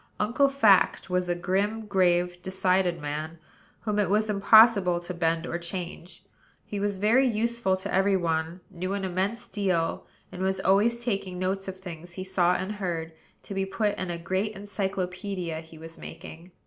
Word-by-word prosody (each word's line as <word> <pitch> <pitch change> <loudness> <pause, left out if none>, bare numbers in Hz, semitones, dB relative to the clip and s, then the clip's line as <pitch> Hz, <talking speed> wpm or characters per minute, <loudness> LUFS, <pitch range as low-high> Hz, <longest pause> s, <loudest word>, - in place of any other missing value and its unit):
Uncle 240 +6 +3
Fact 210 -8 +3
was 180 -1 0
a 175 - +1
grim, 200 +5 -1
grave, 180 -3 +1
decided 185 -1 +1
man; 155 +2 -4 0.4
whom 210 -2 -1
it 200 -4 +1
was 215 +1 +2
impossible 200 -3 +6
to 175 +1 -6
bend 165 -1 0
or 170 - -3
change. 175 0 -7 0.4
He 205 - -4
was 200 -1 -1
very 230 +7 +4
useful 230 -3 0
to 190 - -5
every 195 +1 +3
one; 165 0 -2
knew 185 +1 -3
an 200 -1 -2
immense 190 +5 -2
deal; 185 -5 -1 0.2
and 180 - -7
was 190 0 0
always 225 +5 +2
taking 195 -6 -2
notes 190 +1 -2
of 190 -1 -6
things 175 -2 -9
he 185 - -5
saw 180 -1 +2
and 190 +2 -3
heard, 170 -4 -3 0.3
to - - -7
be 195 0 0
put 205 +2 -1
in 185 - -3
a 170 - -3
great 190 +5 -2
encyclopædia 190 -3 -3
he 160 0 -14
was 165 +1 -11
making. 165 +3 -10
190 Hz, 175 wpm, -27 LUFS, 175-205 Hz, 0.4 s, impossible